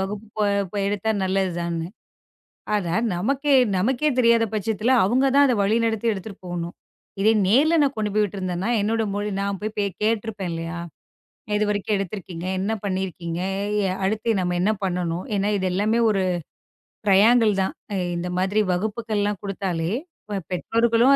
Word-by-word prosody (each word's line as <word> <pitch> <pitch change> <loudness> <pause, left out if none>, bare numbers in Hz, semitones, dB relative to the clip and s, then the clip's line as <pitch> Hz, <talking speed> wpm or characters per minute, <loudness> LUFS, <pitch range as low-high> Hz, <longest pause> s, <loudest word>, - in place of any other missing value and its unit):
வகுப்பு 205 +3 -4 0.5
போ - - -5
எடுத்தா 205 +2 -1
நல்லதுதான்னு. 175 -3 -1 0.9
ஆனா 180 -5 0 0.2
நமக்கே 275 +10 +1 0.2
நமக்கே 265 +9 +1
தெரியாத 235 -1 +5
பட்சத்துல 215 +3 0
அவங்க 250 +6 +2
தான் 285 0 +7
அத 250 - +3
வழிநடத்தி 225 +2 +1
எடுத்துட்டு 200 0 -8
போகணும். 175 -1 -4 0.5
இத 215 - +5 0.2
நேர்ல 295 - +4
நான் 280 -1 +1
கொண்டு 210 -1 -1
போய் 215 0 +3
விட்டுருந்தேன்னா, 185 0 -2
என்னோட 225 +2 +1
மொழி 205 0 -2
நான் 200 0 -1
போய்க் 210 -2 -2
கேட்டு 220 -1 +2
இருப்பேன் 195 -5 -4
இல்லையா? 165 +1 -4 0.8
இதுவரைக்கும் 210 0 0
எடுத்து 195 0 -3
இருக்கீங்க. 180 -2 -7
என்ன 200 +4 -1
பண்ணி 190 -1 -1
இருக்கீங்க? 170 -1 -5 0.6
அடுத்து 215 +3 0
நாம 180 -1 0
என்ன 205 +4 +3
பண்ணணும்? 175 -1 -1
ஏன்னா 200 +1 +1
இது 190 - -1
எல்லாமே 210 +5 +1
ஒரு 195 -2 +1 0.8
ட்ரையாங்கிள் 215 +3 +5
தான். 190 - -1 0.4
இந்த 175 +1 -3
மாதிரி 195 +3 +2
வகுப்புகள் 215 +3 -1
எல்லாம் 205 -1 -1
கொடுத்தாலே, 185 -4 -2 0.6
பெற்றோர்களும் 230 +7 +3
205 Hz, 140 wpm, -23 LUFS, 185-225 Hz, 0.9 s, தான்